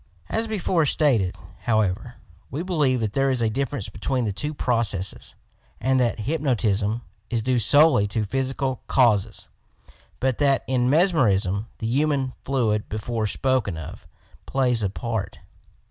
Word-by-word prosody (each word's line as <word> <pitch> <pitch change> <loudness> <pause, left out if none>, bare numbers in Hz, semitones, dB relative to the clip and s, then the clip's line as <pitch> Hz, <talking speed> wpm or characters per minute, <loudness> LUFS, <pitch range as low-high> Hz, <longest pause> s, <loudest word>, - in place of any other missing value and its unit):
25S - - -30
YOUR - - -36
PSYCHIC - - -34
POWERS 225 - 0
As - - -3
before 185 -6 +1
stated, 120 - +2 0.2
however, 110 +1 0 0.3
we 145 +7 -4
believe 150 -9 +1
that 110 -2 -2
there 135 0 +2
is 130 -3 0
a 110 - +1
difference 125 -4 -2
between 125 +4 -2
the 105 - -2
two 145 +10 -2
processes, 105 -8 -2 0.4
and 130 0 +2
that 120 -3 0
hypnotism 115 -5 0 0.3
is 115 -2 -1
due 125 0 +1
solely 145 -2 +5
to 110 +1 -1
psychical 130 +2 -2
causes, 115 -7 +2 0.7
but 130 -2 0
that, 140 -2 +3
in 125 -1 +1
mesmerism, 115 - +2
the - - -5
human 135 +1 0
fluid 115 -6 0
before 110 +1 -2
spoken 120 -7 0
of, 80 - -9 0.4
plays 125 -4 +1
a 100 - 0
part. 110 +1 -4
125 Hz, 155 wpm, -24 LUFS, 105-135 Hz, 0.7 s, solely